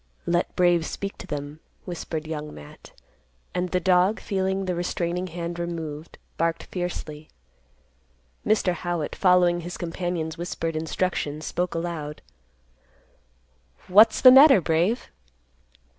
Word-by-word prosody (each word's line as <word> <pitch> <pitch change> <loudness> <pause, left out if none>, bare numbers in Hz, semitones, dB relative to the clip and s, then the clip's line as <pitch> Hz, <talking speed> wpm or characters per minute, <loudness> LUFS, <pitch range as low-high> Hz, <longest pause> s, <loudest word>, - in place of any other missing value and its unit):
"Let 175 +1 0
Brave 175 -2 +3
speak 200 0 -6
to - - -9
them," 145 +1 -6 0.3
whispered 160 -3 -5
Young 150 -1 -5
Matt; 75 0 -13 0.6
and 180 0 -1
the 180 - +1
dog, 185 +3 +3
feeling 190 0 -1
the 180 - -1
restraining 175 +1 -2
hand 170 0 -5
removed, 165 -2 -6 0.2
barked 165 0 0
fiercely. 160 -4 -6 1.1
Mr. 210 -4 +2
Howitt, 175 -2 -3
following 180 -2 +3
his 175 +1 -7
companion's 170 -2 -4
whispered 165 -2 -3
instructions, 155 -2 -2
spoke 180 0 -2
aloud, 165 -3 -5 1.6
"What's 215 +4 +6
the 255 - +10
matter, 270 -2 +8
Brave?" 175 +8 0
175 Hz, 115 wpm, -25 LUFS, 160-180 Hz, 1.6 s, the